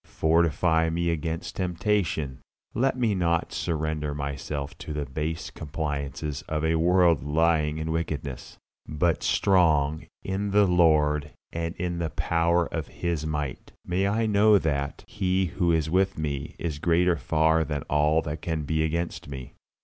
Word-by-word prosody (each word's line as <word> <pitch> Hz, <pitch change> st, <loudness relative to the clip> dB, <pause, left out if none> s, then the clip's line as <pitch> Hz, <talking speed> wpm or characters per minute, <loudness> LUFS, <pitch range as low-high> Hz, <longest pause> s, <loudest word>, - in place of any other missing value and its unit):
Fortify 80 Hz, 0 st, +2 dB
me 85 Hz, +1 st, 0 dB
against 80 Hz, 0 st, -3 dB
temptation; 90 Hz, -6 st, -1 dB, 0.3 s
let 130 Hz, +2 st, +1 dB
me 115 Hz, -4 st, +2 dB
not 85 Hz, -3 st, 0 dB
surrender 80 Hz, -2 st, -2 dB
myself 70 Hz, 0 st, -4 dB
to 75 Hz, -, -6 dB
the 75 Hz, -1 st, -2 dB
base 75 Hz, +4 st, -4 dB
compliances 75 Hz, -1 st, -4 dB
of 75 Hz, 0 st, -1 dB
a 80 Hz, -, +2 dB
world 85 Hz, -2 st, +4 dB
lying 75 Hz, 0 st, +2 dB
in 80 Hz, 0 st, -3 dB
wickedness. 75 Hz, -5 st, -4 dB, 0.3 s
But, 85 Hz, +2 st, 0 dB
strong 80 Hz, -5 st, +2 dB, 0.2 s
in 100 Hz, +2 st, -2 dB
the 100 Hz, +1 st, +5 dB
Lord 75 Hz, -4 st, +3 dB, 0.2 s
and 85 Hz, +1 st, -3 dB
in 90 Hz, -1 st, -3 dB
the 85 Hz, -2 st, -1 dB
power 85 Hz, +2 st, +1 dB
of 80 Hz, -3 st, -4 dB
His 85 Hz, -3 st, -3 dB
might, 75 Hz, -4 st, -4 dB
may 95 Hz, +3 st, +1 dB
I 110 Hz, +3 st, +1 dB
know 105 Hz, 0 st, +5 dB
that 70 Hz, -5 st, -2 dB
He 95 Hz, -2 st, 0 dB
who 85 Hz, 0 st, 0 dB
is 80 Hz, -2 st, +1 dB
with 95 Hz, +3 st, +1 dB
me 75 Hz, -1 st, -3 dB
is 80 Hz, -4 st, -4 dB
greater 85 Hz, +2 st, +3 dB
far 80 Hz, +3 st, +2 dB
than 75 Hz, -2 st, -3 dB
all 75 Hz, +2 st, +2 dB
that 75 Hz, -1 st, -5 dB
can 80 Hz, -2 st, -2 dB
be 80 Hz, +2 st, 0 dB
against 85 Hz, -1 st, -2 dB
me. 65 Hz, -2 st, -8 dB
80 Hz, 150 wpm, -26 LUFS, 75-85 Hz, 0.3 s, the